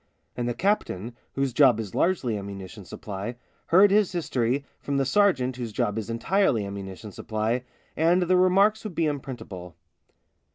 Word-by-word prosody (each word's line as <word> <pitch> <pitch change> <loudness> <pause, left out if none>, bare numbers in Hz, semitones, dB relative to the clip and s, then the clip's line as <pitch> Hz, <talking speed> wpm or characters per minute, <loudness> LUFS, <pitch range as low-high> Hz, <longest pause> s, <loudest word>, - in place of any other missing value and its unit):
And 120 0 -2
the 120 - -2
captain, 120 - -1 0.2
whose 135 -2 -1
job 125 -3 +5
is 105 -4 -5
largely 160 -11 +1
ammunition 100 0 -7
supply, 100 +6 -6 0.3
heard 190 +4 +6
his 205 -1 +3
history 135 -6 -1
from 140 -1 -2
the 135 - +2
sergeant 135 -6 +2
whose 120 -3 -4
job 105 +1 -1
is 110 - -6
entirely 115 - +1
ammunition 100 +1 -7
supply, 110 +5 -2 0.3
and 170 +3 +3
their 180 +1 +3
re 185 0 +5
marks 205 +4 +3
would 210 -6 -6
be 165 - +1
unprintable. 110 - -5
125 Hz, 160 wpm, -26 LUFS, 110-175 Hz, 0.3 s, heard